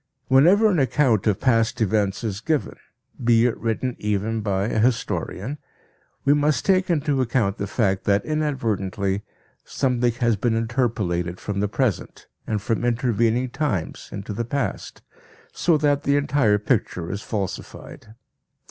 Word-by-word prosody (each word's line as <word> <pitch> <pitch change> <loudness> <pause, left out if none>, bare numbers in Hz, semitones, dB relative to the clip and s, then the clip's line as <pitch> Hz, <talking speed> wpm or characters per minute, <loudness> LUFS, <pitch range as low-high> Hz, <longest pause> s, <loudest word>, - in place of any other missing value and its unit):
Whenever 175 +12 +6
an 185 -6 +2
account 130 -5 +2
of 105 -3 +2
past 115 -2 +2
events 105 -1 0
is 105 -2 -3
given, 155 +2 -1 0.5
be 115 0 +4
it 125 - +1
written 115 +2 -2
even 105 +2 -1
by 100 -2 0
a 110 - -1
historian, 120 +2 -1 0.7
we 140 - +5
must 150 0 +1
take 185 -1 +2
into 145 -4 +1
account 115 -5 0
the 100 - -2
fact 95 -3 0
that 100 0 +2
inadvertently 105 -10 -1 0.4
something 125 -3 0
has 120 -1 +1
been 115 +3 0
interpolated 110 -7 -1
from 100 -1 -4
the 105 - +1
present 115 -4 -2 0.2
and 105 -2 -2
from 115 +1 -1
intervening 120 0 +1
times 115 - -3
into 100 +1 -6
the 115 - -2
past; 120 -2 -4 0.5
so 170 -3 +2
that 145 -1 +1
the 140 0 +2
entire 140 -7 +2
picture 100 -6 -1
is 100 +2 -4
falsified. 105 +1 -6
115 Hz, 145 wpm, -23 LUFS, 105-135 Hz, 0.7 s, Whenever